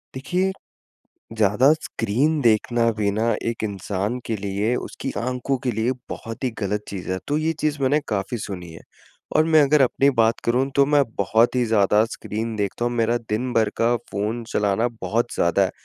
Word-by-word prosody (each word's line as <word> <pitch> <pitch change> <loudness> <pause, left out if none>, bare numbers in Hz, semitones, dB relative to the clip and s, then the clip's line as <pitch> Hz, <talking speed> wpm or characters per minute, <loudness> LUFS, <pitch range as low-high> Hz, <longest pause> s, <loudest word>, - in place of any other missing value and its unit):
देखिए, 180 +8 0 0.9
ज़्यादा 110 +7 +4
स्क्रीन 145 +1 -1
देखना 115 0 +3
भी 105 -1 +1
ना 110 +3 -1 0.2
एक 115 -1 -3
इंसान 100 +3 -2
के 115 - -1
लिए 100 +4 -1
उसकी - - -5
आँखों 125 +2 -1
के 125 - 0
लिए 110 +3 0 0.2
बहुत 115 +3 -7
ही 130 - +1
ग़लत 105 0 -2
चीज़ 95 -3 -6
है, 95 - -1
तो 145 - +1
ये 155 +1 0
चीज़ 150 -2 -1
मैंने 140 +3 +3
काफ़ी 105 +3 -2
सुनी 90 -5 -7
है 80 - -11 0.5
और - - +6
मैं 160 -1 +5
अगर 145 +1 +4
अपनी 135 +2 +3
बात 115 +1 +2
करूँ 125 +3 +2
तो 140 - +5
मैं 145 0 +4
बहुत 110 +5 +3
ही 125 -1 +2
ज़्यादा 105 -1 +3
स्क्रीन 115 0 -5
देखता 105 +3 -2
हूँ, 120 - 0
मेरा 115 0 +1
दिन 120 +4 -1
भर 110 -2 +3
का 115 +1 +3 0.2
फ़ोन 110 +4 -2
चलाना 105 +3 +1
बहुत 115 +6 -1
ज़्यादा 85 +3 +2
है। 95 - -1
115 Hz, 185 wpm, -23 LUFS, 105-130 Hz, 0.9 s, और